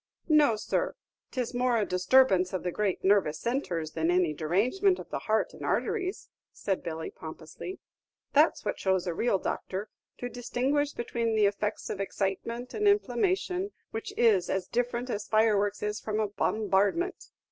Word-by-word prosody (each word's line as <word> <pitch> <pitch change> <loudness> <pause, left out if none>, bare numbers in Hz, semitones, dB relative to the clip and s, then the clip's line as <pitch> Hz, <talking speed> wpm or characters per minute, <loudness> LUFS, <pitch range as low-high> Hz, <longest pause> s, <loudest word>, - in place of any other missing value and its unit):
"No, 300 -7 +5
sir; 365 - -1 0.3
'tis 250 -1 -3
more 245 -1 +2
a 215 - +1
disturbance 185 0 +4
of 185 - -2
the 180 - -1
great 200 0 -1
nervous 190 -6 +3
centres 175 - -2
than 160 +1 0
any 175 -3 +3
derangement 230 - +2
of - - -10
the - - -2
heart 220 0 0
and - - -10
arteries," 380 -3 -1 0.2
said 195 -2 -2
Billy, 160 -1 -5
pompously; 160 - -8 0.6
"that's 300 -3 +4
what 205 - -2
shows 190 -2 +1
a 175 - -1
real 215 +3 +1
doctor, 195 +2 -4 0.3
to 245 - -4
distinguish 265 +4 -1
between 230 -1 -1
the 215 -1 +4
effects 205 +1 -1
of 200 - -4
excitement 205 +5 -3
and 420 -1 +1
inflammation, 375 - +1 0.2
which 225 - -5
is 205 -7 +4
as 190 -2 0
different 245 +2 -1
as 205 -1 -3
fireworks 210 -2 +2
is 210 +1 -1
from 215 0 -2
a 215 - +1
bombardment." 210 - 0
215 Hz, 160 wpm, -29 LUFS, 190-255 Hz, 0.6 s, No